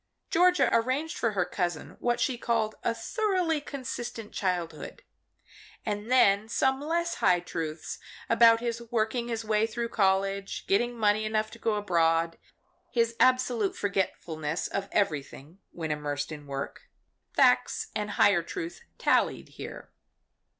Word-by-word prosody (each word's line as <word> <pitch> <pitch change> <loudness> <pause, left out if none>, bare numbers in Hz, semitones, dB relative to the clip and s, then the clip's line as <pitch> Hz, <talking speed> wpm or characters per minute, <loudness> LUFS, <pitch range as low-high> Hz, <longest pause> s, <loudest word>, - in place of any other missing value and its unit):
Georgia 360 +1 +4
arranged 260 +8 +1
for 230 -3 0
her 185 -3 +1
cousin 175 -3 -3
what 240 0 0
she 255 +1 +1
called 225 -2 0
a - - +2
thoroughly 350 - 0
consistent 240 -5 -6
childhood. 180 -4 -3 0.8
And 210 +1 -3
then 210 -4 +4
some 265 +3 +1
less 340 +3 0
high 180 -1 +5
truth 165 -2 -5 0.3
about 230 -1 +6
his 235 -1 -2
working 235 +1 0
his 230 -1 -3
way 215 0 +2
through 235 +1 -3
college, 195 -1 0
getting 240 +5 +1
money 215 -1 +2
enough 215 0 -1
to 235 - -12
go 220 -1 0
abroad, 165 -4 +1 0.5
his 230 -1 +1
absolute 250 -5 +3
forgetfulness 170 -5 -2
of 200 0 -3
everything 155 -3 -2
when 160 -2 -4
immersed 145 -1 -3
in 145 -2 -8
work 140 0 -6 0.5
facts - - +3
and 210 -1 -2
higher 200 -4 +5
truth 345 - -6 0.2
tallied - - +1
here. - - -9
215 Hz, 135 wpm, -28 LUFS, 180-240 Hz, 0.8 s, about